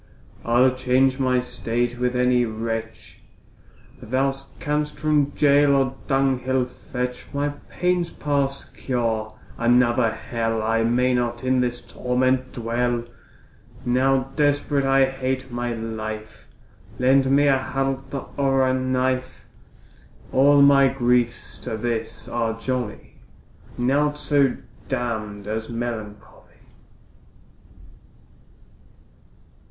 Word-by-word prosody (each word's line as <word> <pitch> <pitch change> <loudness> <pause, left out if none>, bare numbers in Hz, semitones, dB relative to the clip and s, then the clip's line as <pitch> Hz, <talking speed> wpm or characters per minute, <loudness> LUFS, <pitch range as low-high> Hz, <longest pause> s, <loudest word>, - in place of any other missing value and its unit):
I'll 125 +2 +4
change 130 +1 +2
my 130 -1 +2
state 120 0 -2
with 125 0 0
any 125 0 +3
wretch, 115 0 -5 0.8
Thou 135 +3 0 0.3
canst 150 0 -2
from 150 -2 +1
gaol 145 -1 +5
or 135 -1 +1
dunghill 130 -1 +1
fetch; 125 0 -5
My 145 +1 0 0.2
pain's 180 -1 0
past 140 -3 -2
cure, 115 -4 -2 0.2
another 120 0 +3
hell, 115 0 -2
I 115 +1 +1
may 125 +2 +2
not 120 0 -1
in 130 0 +2
this 120 -1 -2
torment 130 +1 0
dwell! 120 +1 -1 0.8
Now 130 +2 +2
desperate 145 -1 +1
I 135 0 +4
hate 130 -1 -3
my 120 0 -2
life, 110 -1 -6 0.5
Lend 130 +1 +3
me 140 +2 +4
a 135 -1 +4
halter 135 0 -3
or 135 -1 +2
a 130 - +2
knife; 130 0 -1 0.9
All 140 +1 +5
my 140 -1 +6
griefs 120 -2 0
to 110 - -5
this 115 0 -3
are 115 -1 -2
jolly, 125 -3 -4 0.6
Naught 145 +4 +1
so 140 -3 +2 0.3
damn'd 110 -5 -3
as 110 +1 -4
melancholy. 115 -3 -7
125 Hz, 105 wpm, -23 LUFS, 120-135 Hz, 0.9 s, my